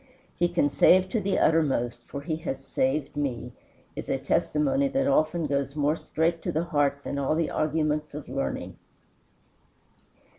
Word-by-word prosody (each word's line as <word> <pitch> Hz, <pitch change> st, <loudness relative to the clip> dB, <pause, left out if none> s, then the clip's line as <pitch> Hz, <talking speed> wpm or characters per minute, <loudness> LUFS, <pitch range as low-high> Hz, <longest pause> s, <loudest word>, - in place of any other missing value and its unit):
"He 175 Hz, -, +1 dB
can 175 Hz, -4 st, +2 dB
save 185 Hz, +5 st, +5 dB
to 225 Hz, -, 0 dB
the 195 Hz, 0 st, 0 dB
uttermost, 130 Hz, -7 st, +1 dB
for 140 Hz, -, -6 dB
he 155 Hz, +1 st, -3 dB
has 135 Hz, -4 st, -5 dB
saved 135 Hz, +3 st, -1 dB
me," 125 Hz, -4 st, -3 dB, 0.4 s
is -, -, -6 dB
a -, -, +1 dB
testimony 280 Hz, -2 st, +1 dB
that 270 Hz, 0 st, 0 dB
often 165 Hz, -, +2 dB
goes 140 Hz, -1 st, -1 dB
more 150 Hz, +1 st, +2 dB
straight 165 Hz, +1 st, -1 dB
to -, -, -2 dB
the 160 Hz, +3 st, 0 dB
heart 145 Hz, -4 st, 0 dB
than 140 Hz, -, -3 dB
all 140 Hz, +3 st, +1 dB
the 165 Hz, 0 st, 0 dB
arguments 150 Hz, -1 st, -1 dB
of 150 Hz, -, -7 dB
learning. 135 Hz, +2 st, -4 dB
155 Hz, 160 wpm, -27 LUFS, 140-170 Hz, 0.4 s, save